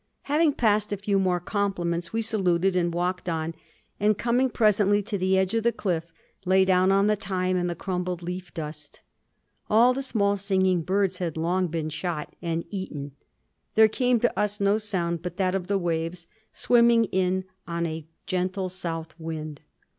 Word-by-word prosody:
Having 300 +1 +2
passed 210 -4 +1
a 205 - -1
few 200 0 0
more 185 -2 +1
compliments, 175 -3 -2
we 225 0 -1
saluted 190 -4 +1
and 175 -1 +1
walked 180 +1 -2
on; 165 0 -2 0.5
and, 210 0 +3
coming 245 +2 +2
presently 205 -3 +3
to 205 +1 -4
the 190 0 +2
edge 190 +2 +1
of 225 - +2
the 235 +1 +2
cliff, 170 -7 -2 0.3
lay 190 0 +4
down 185 0 +4
on 195 +1 +4
the 210 0 +3
thyme 185 -2 -1
and 175 -1 0
the 170 - -3
crumbled 180 -1 -3
leaf 180 +1 -5
dust. 150 -2 -8 0.7
All 235 +4 +5
the 270 - -3
small 205 -6 +1
singing 190 -2 +1
birds 190 +1 0
had 170 -4 -3
long 180 +3 +1
been 160 -1 -3
shot 155 -1 -4
and 165 -1 -2
eaten; 150 -8 -5 0.6
there 220 0 +7
came 245 +2 +1
to 240 - +1
us 210 0 0
no 200 +2 +3
sound 175 -6 -2
but 180 0 -6
that 185 -1 +1
of 190 -2 -2
the 200 0 +1
waves 170 -1 -2 0.3
swimming 235 -1 +4
in 185 -1 0 0.2
on 170 0 -2
a 160 -1 -5 0.2
gentle 185 0 -1
south 165 -3 -5
wind. 155 -2 -6
185 Hz, 175 wpm, -26 LUFS, 170-205 Hz, 0.7 s, there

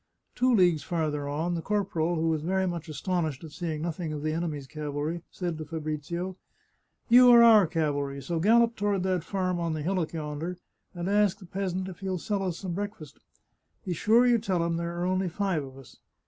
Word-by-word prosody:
Two 255 +1 +2
leagues 175 -6 +4
farther 150 -3 -2
on 160 +5 -1
the 170 - -2
corporal, 175 -4 0
who 165 0 +1
was 160 -2 0
very 190 +4 0
much 170 -2 -4
astonished 160 -2 -2
at 160 - -9
seeing 155 -1 -4
nothing 170 -1 -3
of 150 -1 -5
the 155 0 0
enemy's 155 -4 -3
cavalry, 150 +3 -4
said 175 -4 -4
to 155 - -5
Fabrizio: 160 +4 -4 0.3
" - - -47
You 250 +1 +8
are 235 -1 +9
our 220 -5 +7
cavalry, 145 -4 -1
so 160 +5 -3
gallop 230 +5 +4
toward 205 -3 0
that 185 -3 0
farm 185 -1 -1
on 170 -1 -1
the 155 -1 -3
hillock 180 -1 -1
yonder, 160 +3 -4 0.4
and 175 0 -4
ask 205 -1 +3
the 195 - -13
peasant 185 0 -3
if 180 -2 -9
he'll 190 -2 -2
sell 200 +3 -2
us 180 -3 -2
some 185 -3 -5
breakfast. 200 -6 -6 0.7
Be 180 - -1
sure 225 +8 +4
you 240 -1 +4
tell 185 -6 0
him 170 0 -1
there 170 0 -3
are 175 - 0
only 185 0 0
five 185 -3 -1
of 135 -1 -11
us. 135 -2 -14
175 Hz, 205 wpm, -28 LUFS, 155-190 Hz, 0.7 s, are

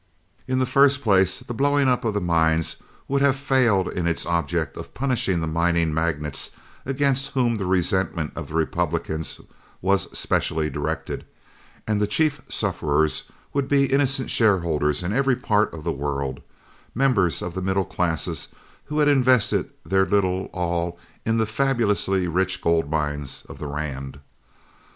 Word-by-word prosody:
In 130 0 0
the 130 - +2
first 140 +1 +4
place, 95 -3 +3
the - - -6
blowing 140 +2 +2
up 125 -1 +2
of 110 -3 -1
the 105 - 0
mines 80 -2 +1 0.3
would 140 0 +1
have 140 -1 +4
failed 130 -9 +2
in 85 -1 -2
its 85 - -1
object 85 -2 -1
of - - -9
punishing 120 -9 0
the - - -1
mining 85 0 +1
magnates 75 -3 -1 0.4
against 135 0 0
whom 120 -4 +2
the 95 -3 -3
resentment 90 -3 0
of 80 -3 -5
the 80 - -8
Republicans 80 -1 -1 0.4
was 95 0 +1
specially 80 -1 0
directed, 75 +4 -3 0.6
and 105 -1 +1
the 105 - +2
chief 150 +7 +1
sufferers 75 +1 0 0.3
would 140 -1 0
be 140 -1 +2
innocent 135 -2 +1
shareholders 85 -8 +2
in 90 +4 -1
every 135 +1 +2
part 110 -4 +1
of 80 -2 -8
the 85 - -1
world, 70 -2 -3 0.6
members 105 - +2
of 90 - -4
the 95 - -3
middle 95 0 0
classes 80 -2 -2 0.4
who 150 - -4
had 150 -1 +4
invested 130 -5 +3 0.2
their 95 0 +2
little 95 -1 +1
all 85 -1 -2 0.3
in 115 0 +2
the 110 - +2
fabulously 110 -6 +1
rich 95 +3 0
gold 80 -3 +1
mines 75 -2 -3
of - - -11
the 75 - -5
Rand. 70 -2 -5
95 Hz, 155 wpm, -24 LUFS, 80-125 Hz, 0.6 s, first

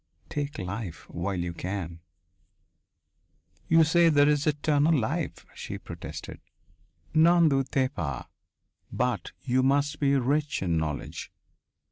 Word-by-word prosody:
Take 145 +1 -3
life 95 - -5
while 90 +3 -2
you 85 0 -3
can." 85 -1 -5 1.7
"You 165 0 +6
say 170 +1 +4
there 145 -2 +5
is 150 0 +2
eternal 150 +1 +3
life," 145 +7 -2
she - - -6
protested. - - -8 0.7
"N'en 165 +1 +6
doutez 135 -1 +1
pas! 70 - -4 0.7
But 120 -8 -1
you 130 0 +2
must 140 +2 +1
be 140 -1 +3
rich 140 0 0
in 85 -3 0
knowledge. 80 -2 -3
135 Hz, 115 wpm, -27 LUFS, 95-150 Hz, 1.7 s, You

